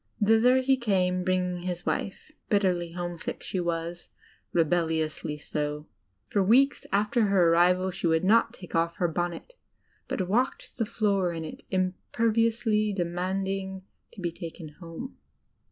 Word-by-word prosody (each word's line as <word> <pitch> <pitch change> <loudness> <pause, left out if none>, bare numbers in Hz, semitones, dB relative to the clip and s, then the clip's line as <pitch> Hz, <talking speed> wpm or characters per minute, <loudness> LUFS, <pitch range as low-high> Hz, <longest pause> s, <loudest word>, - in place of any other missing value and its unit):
Thither 225 +4 +5
he 265 +1 +3
came, 185 -6 +1
bringing 180 -1 0
his 175 -1 -4
wife. 200 +9 -3 0.2
Bitterly 180 -5 +1
homesick 175 -1 -5
she 185 - -3
was 170 0 -3 0.2
— - - -35
rebel 170 0 +2
liously 155 -2 -2
so. 150 0 -3 0.4
For 200 - +1
weeks 255 +8 +3
after 210 +3 +2
her 185 -4 +4
arrival 180 +2 +3
she 180 -1 -2
would 160 +1 +2
not 220 +5 +4
take 180 - -12
off 165 0 +1
her 175 - +1
bonnet, 175 - -3 0.5
but 185 - -2
walked 245 +7 -1
the 225 - +2
6oor 195 -6 0
in 160 - -4
it, - - -8
imperiously 215 +3 +1
demand 185 +1 -1
ing 190 -1 -4 0.3
to 195 - -10
be 175 -1 -1
taken 165 -1 -8
home. 170 +9 -8
185 Hz, 150 wpm, -27 LUFS, 170-210 Hz, 0.5 s, Thither